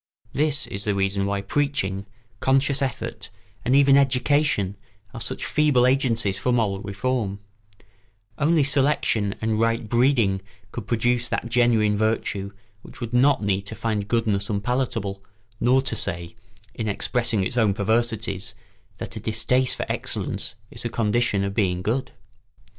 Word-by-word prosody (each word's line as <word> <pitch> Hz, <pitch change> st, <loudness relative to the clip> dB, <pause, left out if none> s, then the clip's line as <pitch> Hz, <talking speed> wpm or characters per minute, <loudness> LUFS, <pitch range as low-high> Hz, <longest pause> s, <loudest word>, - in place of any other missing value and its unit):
This 150 Hz, 0 st, +1 dB
is 100 Hz, +1 st, -3 dB
the 105 Hz, -1 st, +1 dB
reason 100 Hz, 0 st, 0 dB
why 100 Hz, 0 st, -1 dB
preaching, 100 Hz, -5 st, -1 dB, 0.3 s
conscious 135 Hz, +1 st, +2 dB
effort, 135 Hz, -2 st, -3 dB, 0.3 s
and 125 Hz, +3 st, +2 dB
even 140 Hz, -1 st, +6 dB
education 135 Hz, -6 st, +2 dB, 0.4 s
are 115 Hz, -, -7 dB
such -, -, -3 dB
feeble 145 Hz, -5 st, +3 dB
agencies 120 Hz, -6 st, +1 dB
for 125 Hz, -, 0 dB
moral 105 Hz, -5 st, +1 dB
reform: 105 Hz, 0 st, -2 dB, 1.0 s
only 155 Hz, 0 st, +3 dB
selection 135 Hz, -7 st, +1 dB
and 110 Hz, -1 st, 0 dB
right 115 Hz, 0 st, +1 dB
breeding 120 Hz, -5 st, +2 dB, 0.3 s
could 100 Hz, -, -7 dB
produce 120 Hz, +1 st, +1 dB
that 115 Hz, -, -2 dB
genuine 115 Hz, -3 st, +3 dB
virtue 105 Hz, -2 st, -1 dB, 0.3 s
which -, -, -13 dB
would 120 Hz, 0 st, -5 dB
not 130 Hz, -1 st, +4 dB
need 100 Hz, 0 st, 0 dB
to 110 Hz, -, -6 dB
find 110 Hz, -2 st, -2 dB
goodness 110 Hz, -3 st, 0 dB
unpalatable 105 Hz, -2 st, -2 dB, 0.4 s
nor 130 Hz, +3 st, +3 dB
to -, -, -2 dB
say, 85 Hz, 0 st, -3 dB, 0.4 s
in 110 Hz, -, -4 dB
expressing 115 Hz, 0 st, 0 dB
its 105 Hz, -, -3 dB
own 110 Hz, -5 st, +3 dB
perversities, 110 Hz, -1 st, -1 dB, 0.4 s
that -, -, -7 dB
a -, -, -4 dB
distaste 125 Hz, +4 st, +1 dB
for -, -, -3 dB
excellence -, -, -3 dB, 0.2 s
is -, -, -5 dB
a -, -, -2 dB
condition 115 Hz, -2 st, +1 dB
of 100 Hz, 0 st, -2 dB
being 90 Hz, -4 st, 0 dB
good. 120 Hz, +6 st, -1 dB
115 Hz, 145 wpm, -24 LUFS, 100-130 Hz, 1.0 s, even